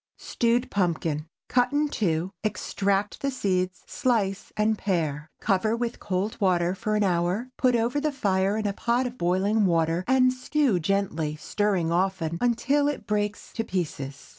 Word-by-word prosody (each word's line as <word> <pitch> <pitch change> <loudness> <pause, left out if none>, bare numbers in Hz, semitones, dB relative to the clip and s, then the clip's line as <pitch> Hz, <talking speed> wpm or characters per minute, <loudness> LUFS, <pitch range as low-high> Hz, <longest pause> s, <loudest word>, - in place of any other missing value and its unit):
STEWED 240 +1 0
PUMPKIN. 165 -5 0 0.2
Cut 245 +1 +2
in 295 +1 +2
two, 180 - -1
extract 200 -1 -1
the 275 - 0
seeds, 185 -7 -1
slice, 205 -6 -1
and 215 +1 +2
pare. 155 -7 -2
Cover 215 +2 +1
with 235 0 -3
cold 200 +4 -2
water 180 -2 +2
for 215 +3 -2
an 210 - +2
hour; 185 +6 0
put 255 -2 +3
over 235 +5 +1
the 305 0 0
fire 200 -6 +1
in 215 - -2
a 200 - 0
pot 240 +5 0
of 250 0 -4
boiling 195 +4 +2
water 165 0 +1
and 255 0 +4
stew 255 -5 +1
gently, 165 -4 -1
stirring 185 +1 0
often, 170 -2 0
until 270 +4 +2
it 290 -7 -3
breaks 210 0 -2
to 225 - -2
pieces. 150 -9 -4
200 Hz, 160 wpm, -26 LUFS, 180-235 Hz, 0.2 s, and